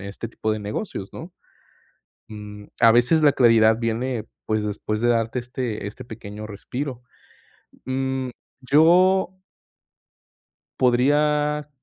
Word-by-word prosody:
este 100 +3 -6
tipo 110 -1 -3
de 110 - -3
negocios, 105 - -5
¿no?, 170 +2 -9 1.0
mm, 105 -1 -10
a 115 -1 +7
veces 125 +7 +3
la 145 -2 +6
claridad 115 -3 +4
viene, 115 0 -2 0.2
pues 110 -1 0
después 105 +1 -3
de 120 - +2
darte 115 +1 +1
este 120 -3 -5
este 120 +5 -8
pequeño 105 -2 -9
respiro. 125 +5 -6 0.8
Mm, 130 0 -2 0.4
yo 185 +5 +4 1.4
podría 150 +4 +2
120 Hz, 110 wpm, -23 LUFS, 110-145 Hz, 1.4 s, a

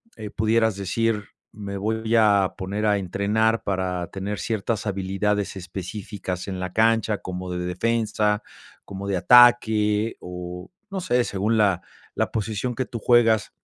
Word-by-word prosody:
eh, 110 -1 -7
pudieras 110 0 +1
decir, 105 +2 -1 0.3
me 100 -1 -7
voy 110 +3 -1
a 100 -4 +4
poner 100 +3 -3
a 105 -1 +3
entrenar 105 +4 0
para 95 -3 -2
tener 100 +1 -4
ciertas 110 -1 -2
habilidades 100 +1 -1
específicas 95 +1 -6
en 95 -2 -4
la 90 -1 -4
cancha, 110 0 +2
como 90 -1 -6
de 90 - -3
defensa, 105 +2 0 0.4
como 100 0 -7
de 100 -2 0
ataque 110 -1 +5
o, 90 - -8 0.2
no 195 -2 -4
sé, 125 -7 +2
según 105 +3 0
la 100 -4 +3 0.3
la - - 0
posición 110 +3 -2
que 130 - -1
tú 120 - -6
juegas. 115 -2 +3
105 Hz, 145 wpm, -24 LUFS, 95-110 Hz, 0.4 s, ataque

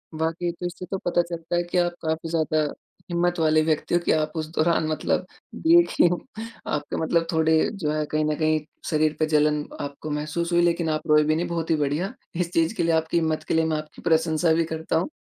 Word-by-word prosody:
वाक़ई 165 +2 -1
तो 180 - -4
इससे 175 +1 -5
तो 195 - 0
पता 175 0 +3
चलता 170 0 -4
है 175 - +2
कि 175 +1 -3
आप 175 0 +2
काफ़ी 160 0 -2
ज़्यादा 155 -1 +1 0.5
हिम्मत 175 0 +1
वाले 155 -1 +4
व्यक्ति 155 +1 -1
हो - - +4
कि - - +3
आप 155 -1 +1
उस 155 -1 -2
दौरान 160 0 +2
मतलब 155 - 0 0.4
देखिम 330 - +5 0.6
आपका 150 -1 -2
मतलब 165 +1 +1
थोड़े 160 0 +2 0.2
जो 160 -7 -2
है 155 0 -1
कहीं 155 0 +1
न 155 0 0
कहीं 155 0 +2 0.3
शरीर 155 -1 +2
पे 155 - +3
जलन 150 0 +3 0.2
आपको 145 +2 -6
महसूस 155 +4 -2
हुई 175 - +5
लेक़िन 170 -1 +1
आप 155 +1 -2
रोए 150 0 +5
भी 155 +1 +1
नहीं 170 +2 -1
बहुत 170 -1 -3
ही - - +4
बढ़िया। 150 - -1 0.2
इस 175 0 -1
चीज़ 165 +4 +2
के - - 0
लिए 165 0 +2
आपकी 160 +1 +1
हिम्मत 160 -1 0
के - - 0
लिए 160 0 +3
मैं 160 -1 0
आपकी 155 0 -9
प्रशँसा 160 0 +2
भी 165 +1 +2
करता 160 0 -3
हूँ। 170 - -1
160 Hz, 225 wpm, -24 LUFS, 155-170 Hz, 0.6 s, देखिम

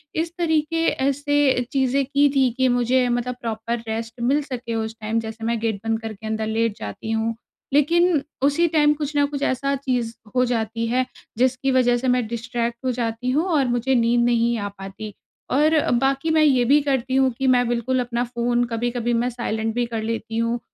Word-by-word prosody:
इस 330 +1 -1
तरीके 330 -1 +1
ऐसे 280 -1 +1
चीज़ें 270 -1 +1
की 285 +2 +3
थी 265 -2 +4
कि 260 0 +3
मुझे 245 +1 +2
मतलब 245 +1 -1
प्रॉपर 230 +1 -3
रेस्ट 225 +2 -5
मिल 270 +5 +2
सके 245 -4 -5
उस 220 0 -3
टाइम 220 +1 0
जैसे 225 0 -7
मैं 230 0 0
गेट 220 -2 -1
बंद 225 0 0
करके 220 -1 -7
अंदर 220 0 -2
लेट 225 -1 0
जाती 105 - -6
हूँ। 225 +1 0 0.4
लेकिन 335 +2 +3 0.2
उसी 290 +5 +3
टाइम 295 -1 +4
कुछ 300 0 -5
न 285 - +4
कुछ 285 -1 -5
ऐसा 275 +2 0
चीज़ 250 -4 -2 0.2
हो 250 - +4
जाती 230 -1 -1
है, 255 +2 +1 0.3
जिसकी 255 +2 +1
वजह 245 -2 +3
से 255 +2 -3
मैं 250 -1 +2
डिस्ट्रैक्ट 235 +1 -3
हो 255 - +2
जाती 235 0 -2
हूँ 305 +6 +1
और 280 -4 +3
मुझे 245 +2 +1
नींद 235 0 +3
नहीं 235 0 +2
आ 205 -2 -3
पाती। 195 +2 -8 0.4
और 305 +3 +4 0.2
बाकी 275 +3 +1
मैं 315 -1 +4
ये 265 -5 +4
भी 285 +5 +5
करती 265 -2 -1
हूँ 265 -1 +3
कि 270 - 0
मैं 245 -1 +4
बिल्कुल 240 +2 0
अपना 240 -1 -1
फ़ोन 240 0 0
कभी-कभी 240 +1 -1
मैं 235 +1 +1
साइलेंट 225 -2 -3
भी 245 0 +1
कर 225 -2 -4
लेती 225 0 -3
हूँ, 230 +1 0
245 Hz, 195 wpm, -22 LUFS, 230-270 Hz, 0.4 s, भी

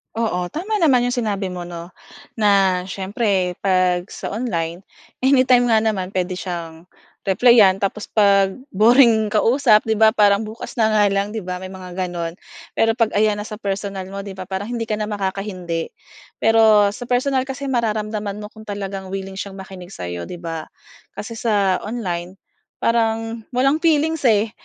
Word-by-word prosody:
Oo, 215 -6 -1
tama 395 +7 -2
naman 285 -10 +4
'yong 245 +1 -1
sinabi 200 -2 -2
mo 180 -1 -6
'no, 170 0 -8 0.5
na 195 -4 +3
siyempre 190 -1 -1
'pag 185 -2 +2
sa - - -5
online, 180 -6 -3 0.4
anytime 255 -2 +5
nga 220 -2 +3
naman 195 -4 -2
puwede 185 0 -2
siyang, 170 -3 -6 0.4
replyan 200 -1 +5
tapos 200 +1 -2
'pag 200 -2 +4 0.2
boring 220 0 +4
kausap 225 0 +4
'di 220 - +1
ba, 220 0 +5
parang 205 -1 +3
"bukas 220 +3 -9
na 220 -1 +3
nga 210 -1 +4
lang," 200 +1 -1
'di 220 - -3
ba 180 -1 -5
may 185 +1 -8
mga 185 -1 -9
gano'n. 170 -1 -5 0.4
Pero 225 0 +3
'pag 230 -2 +1
ayan 210 0 +2
na 210 - -7
sa 215 - -7
personal 195 -2 -4
mo 200 0 -5
'di 195 -1 -9
ba, 185 - -6
parang 190 +3 -4
hindi 235 -2 -3
ka 215 - -3
na 210 - -2
makaka-hindi. 190 -4 -3 0.5
Pero 220 -2 +4
sa 245 +2 -9
personal 260 +2 +1
kasi 275 +1 -5
mararamdaman 215 -4 -2
mo 210 0 -9
kung 220 -1 -13
talagang 195 -1 -5
wiling 195 0 -5
siyang 195 -1 -6
makinig 190 -2 -10
sa'yo 90 - -6
'di 180 - -6
ba? 165 -2 -6 0.5
Kasi 225 +2 -6
sa 205 -5 +1
online, 185 -5 -4 0.4
parang 225 -1 -1
walang 275 +4 +3
feelings, 320 -1 +2
eh. 215 0 +2
205 Hz, 170 wpm, -20 LUFS, 190-225 Hz, 0.5 s, anytime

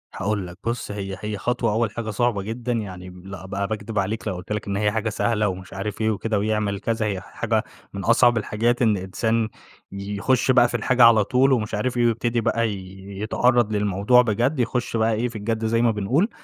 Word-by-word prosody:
هاقول 100 -1 -2
لك 90 0 -11
بُص، 115 -2 -3
هي 95 -2 -5
هي 105 -1 -4
خطوة 120 +1 0
أول 110 0 0
حاجة 110 +1 -5
صعبة 110 -1 0
جدًا. 115 +4 -4
يعني 95 -5 -5 0.2
لأ، 95 -2 -8
أبقى 100 +1 -3
باكدب 110 -1 -3
عليك 105 +3 -2
لو 95 - -1
قُلت 90 +3 -9
لك 105 -1 -2
إن 100 - -1
هي 105 0 +2
حاجة 110 +1 -1
سهلة 105 +1 0
ومش 95 -1 -6
عارف 100 +3 -4
إيه 110 - +2
وكده 110 0 -1
ويعمل 105 -1 -1
كذا، 110 +1 -1
هي 100 -3 -2
ح - - -15
حاجة - - 0 0.3
من 100 -1 -5
أصعب 120 0 +5
الحاجات 115 +3 0
إن 110 -3 +3
إنسان 110 +4 -1 0.4
يخُش 100 +6 0
بقى 120 -1 +5
في 120 - -2
الحاجة 125 +2 +3
على 115 -3 +7
طول 130 +5 +3
ومش 110 -3 -1
عارف 120 +4 -1
إيه، 120 - +3
ويبتدي 120 +1 +1
بقى 115 0 +1
ي 95 -1 -8 0.2
يتعرّض 120 0 +2
للموضوع 105 +4 +3
بجد، 120 +5 0
يخُش 120 -1 -1
بقى 110 0 +2
إيه 115 +3 0
في 120 - -9
الجَد 110 +1 -2
زي 115 +1 +2
ما 120 - +4
بنقول. 120 - +1
110 Hz, 215 wpm, -23 LUFS, 100-120 Hz, 0.4 s, على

